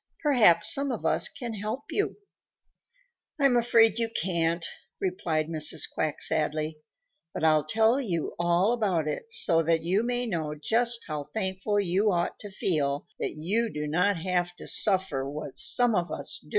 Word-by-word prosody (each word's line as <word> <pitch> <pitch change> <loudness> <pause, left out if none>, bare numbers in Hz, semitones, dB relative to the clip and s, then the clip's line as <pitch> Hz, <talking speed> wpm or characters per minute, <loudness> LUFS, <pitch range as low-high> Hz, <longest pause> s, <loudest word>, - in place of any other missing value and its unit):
"Perhaps 220 - +4
some 280 0 0
of 235 - -5
us - - +3
can 240 -5 -7
help 215 +6 -4
you." 405 - -1 1.2
"I'm 275 -3 +4
afraid 230 -2 +4
you 230 -1 0
can't," 170 -4 0 0.3
replied 165 -4 -1
Mrs. 155 -2 +2
Quack 155 -2 -2
sadly, 155 0 -1 0.6
"but - - -4
I'll 155 -2 +3
tell 225 - +2
you 175 - -3
all 175 +6 +2
about 190 -10 0
it 445 - -5
so 175 - +4
that 165 0 +1
you 185 +5 +1
may 245 +1 -1
know 160 -8 -3
just 230 +10 0
how 150 -3 -4
thankful 195 0 -1
you 200 +2 +1
ought 175 -1 -1
to 205 - -8
feel 145 -7 -1
that - - -3
you 210 +9 -1
do 150 0 -4
not 180 +6 +1
have 175 0 -1
to - - -11
suffer 185 -10 +2
what 145 -2 -7
some 245 -2 +3
of 175 -3 -1
us - - -3
do." - - -20
185 Hz, 165 wpm, -27 LUFS, 160-225 Hz, 1.2 s, Perhaps